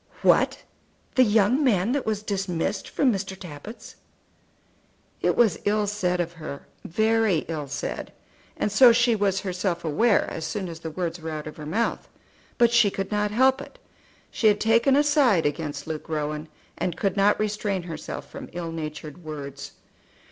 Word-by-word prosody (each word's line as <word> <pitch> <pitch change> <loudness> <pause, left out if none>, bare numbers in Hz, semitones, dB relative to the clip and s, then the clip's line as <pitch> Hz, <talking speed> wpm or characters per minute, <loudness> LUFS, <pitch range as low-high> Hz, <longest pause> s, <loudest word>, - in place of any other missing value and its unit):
"What! - - +3 0.5
the 255 - +5
young 220 +5 +3
man 215 -4 +2
that 280 -2 -1
was 215 -1 -1
dismissed 195 -2 -2
from 260 -4 +2
Mr. 195 -1 -4
Tappitt's?" 190 +8 -10 1.2
It - - +2
was 220 -7 +3
ill 210 +1 +1
said 185 -3 -1
of 170 -1 -2
her, 155 -4 -8 0.2
very 220 -2 +1
ill 155 -3 -4
said, 140 +1 -5 0.5
and 210 - -1
so 240 +4 +8
she 240 0 +3
was 200 -2 +1
herself 180 -2 -2
aware 205 +8 +3
as 165 - -5
soon 180 +3 -3
as 165 -1 -8
the 165 - -5
words 170 +1 -3
were 160 - -5
out 155 -1 -5
of 155 - -8
her 150 -1 -7
mouth. 225 +9 -1 0.5
But 235 -1 +5
she 235 -3 +5
could 195 0 -4
not 210 0 +1
help 260 +5 +3
it. - - -12 0.5
She 220 - +2
had 210 -1 +4
taken 230 +5 +4
a 290 - +5
side 275 - +3
against 145 -1 -3
Luke 160 -1 -6
Rowan, 150 0 -3 0.3
and 175 - -2
could 195 -1 0
not 200 +1 +3
restrain 205 -3 -1
herself 160 -3 -7
from - - -9
ill 170 -1 -4
natured 155 +1 -7
words. 140 -3 -7
195 Hz, 170 wpm, -25 LUFS, 160-220 Hz, 1.2 s, so